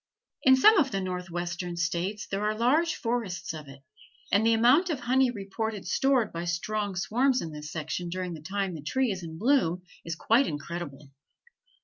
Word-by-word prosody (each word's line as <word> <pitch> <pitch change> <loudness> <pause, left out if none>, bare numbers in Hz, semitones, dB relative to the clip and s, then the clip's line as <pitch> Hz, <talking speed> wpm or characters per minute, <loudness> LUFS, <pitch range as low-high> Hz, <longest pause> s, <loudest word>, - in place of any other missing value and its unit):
In 260 0 +7
some 405 +10 +7
of 275 - +3
the 195 - -2
Northwestern 175 -1 -4
States 170 +5 -1
there 195 +1 -3
are 215 0 0
large 300 +9 +2
forests 230 -8 -3
of 155 -2 -8
it, 135 0 -13 0.5
and 200 +2 +4
the 225 0 +4
amount 255 +11 +4
of 290 -6 -2
honey 255 +2 +3
reported 210 -1 -4
stored 265 -5 +2
by 170 0 -3
strong 200 +4 -2
swarms 250 +8 +2
in 165 - -5
this 150 0 -8
section 160 +2 -4
during 180 0 -3
the 160 - -8
time 190 +3 -2
the 160 - -7
tree 260 - 0
is 190 -1 -4
in 160 -1 -8
bloom 180 - +2 0.2
is 165 0 -4
quite 235 +10 +3
incredible. 145 -2 -6
195 Hz, 180 wpm, -28 LUFS, 170-240 Hz, 0.5 s, In